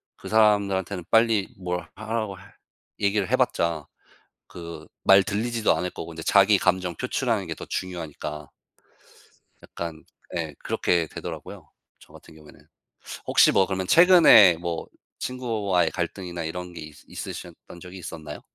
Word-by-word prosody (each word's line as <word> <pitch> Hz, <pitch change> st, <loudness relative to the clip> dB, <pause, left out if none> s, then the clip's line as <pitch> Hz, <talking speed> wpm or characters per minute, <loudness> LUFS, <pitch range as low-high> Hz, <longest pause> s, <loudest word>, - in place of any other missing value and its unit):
그 -, -, -10 dB
사람들한테는 100 Hz, -4 st, +2 dB
빨리 115 Hz, -3 st, +3 dB
뭘 90 Hz, -2 st, -4 dB
하라고 110 Hz, -1 st, -3 dB
할 -, -, -17 dB, 0.4 s
얘기를 100 Hz, -2 st, 0 dB
해 -, -, +3 dB
봤자 85 Hz, -3 st, 0 dB, 0.6 s
그 85 Hz, -1 st, -9 dB, 0.2 s
말 95 Hz, 0 st, +8 dB
들리지도 110 Hz, 0 st, 0 dB
않을 90 Hz, +2 st, -3 dB
거고 85 Hz, 0 st, -8 dB
인제 80 Hz, 0 st, -8 dB
자기 100 Hz, +3 st, +5 dB
감정 90 Hz, -2 st, 0 dB
표출하는 120 Hz, -5 st, -1 dB
게 80 Hz, -, -3 dB
더 -, -, -9 dB
중요하니까 75 Hz, -5 st, -6 dB, 1.1 s
약간 80 Hz, -2 st, -7 dB, 0.3 s
예 80 Hz, -4 st, -4 dB
그렇게 85 Hz, -2 st, 0 dB
되더라고요 -, -, -8 dB, 0.3 s
저 -, -, -19 dB
같은 -, -, -15 dB
경우에는. 75 Hz, -1 st, -16 dB, 0.7 s
혹시 -, -, +5 dB
뭐 95 Hz, -, +3 dB
그러면 95 Hz, -1 st, -3 dB
최근에 165 Hz, -, +7 dB
뭐 85 Hz, -1 st, -4 dB, 0.3 s
친구와의 110 Hz, -8 st, -1 dB
갈등이나 85 Hz, -1 st, -4 dB
이런 90 Hz, +2 st, -6 dB
게 85 Hz, -, -9 dB
있 75 Hz, -1 st, -10 dB
있으셨던 85 Hz, -, -9 dB
적이 90 Hz, +2 st, -10 dB
있었나요? 80 Hz, -4 st, -8 dB
90 Hz, 315 characters per minute, -25 LUFS, 85-105 Hz, 1.1 s, 말